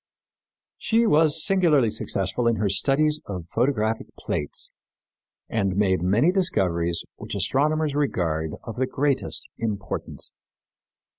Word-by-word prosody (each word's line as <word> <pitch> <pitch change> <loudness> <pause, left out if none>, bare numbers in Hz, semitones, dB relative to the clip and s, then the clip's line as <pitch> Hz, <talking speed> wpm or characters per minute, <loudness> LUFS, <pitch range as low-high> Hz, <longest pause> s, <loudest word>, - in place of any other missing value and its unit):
She 230 +1 +2
was 155 -4 +3
singularly 165 - +3
successful 100 +6 0
in 115 - +3
her 105 -1 0
studies 150 +9 +2
of 90 -4 -5
photographic 115 - 0
plates 75 - -2 0.8
and 100 -4 -1
made 95 -3 +2
many 105 - +3
discoveries 85 - +1
which - - -6
astronomers 155 +2 +1
regard 80 - -1
of 115 - -7
the 130 +1 +1
greatest 140 +1 -1
importance. 105 -3 -4
115 Hz, 115 wpm, -24 LUFS, 95-150 Hz, 0.8 s, was